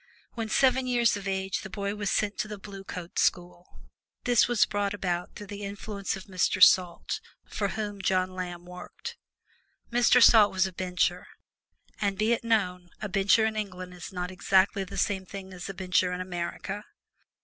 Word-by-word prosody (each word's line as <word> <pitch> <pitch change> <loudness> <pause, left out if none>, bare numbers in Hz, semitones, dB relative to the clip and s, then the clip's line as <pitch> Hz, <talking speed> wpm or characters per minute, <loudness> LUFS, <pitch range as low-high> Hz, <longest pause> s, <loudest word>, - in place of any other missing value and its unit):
When 225 -2 -4
seven 260 +1 +3
years 240 -2 +3
of 200 -1 -6
age 190 0 -1
the 210 - -8
boy 200 0 -3
was 205 -2 -2
sent 210 0 0
to 215 - -1
the 210 -1 -6
Blue 195 -1 -10
Coat 180 -2 -6
School. 175 0 -1 0.4
This 245 -2 +4
was 240 -3 +4
brought 205 0 -1
about 180 -3 -3
through 205 - -8
the 205 0 -8
influence 200 0 -4
of 190 - -8
Mr. 185 -1 0
Salt, 180 -2 +4 0.2
for 200 - -2
whom 205 0 -4
John 185 -1 +1
Lamb 180 -1 -6
worked. 180 - -9 0.8
Mr. 245 +1 +5
Salt 220 -3 +7
was 190 0 +2
a 190 - -5
Bencher, 180 0 -1 0.7
and 200 -2 0
be 215 +3 +2
it 235 - -2
known 180 -6 0
a 210 - -3
Bencher 195 +3 +4
in 220 0 -1
England 185 -4 -5
is 175 -2 -9
not 180 -1 -4
exactly 190 +1 +2
the 190 - -8
same 195 -3 0
thing 190 -1 -8
as 180 +1 -7
a - - -4
Bencher 185 -1 +1
in 180 - -3
America. 185 +3 -4
195 Hz, 180 wpm, -28 LUFS, 185-210 Hz, 0.8 s, Salt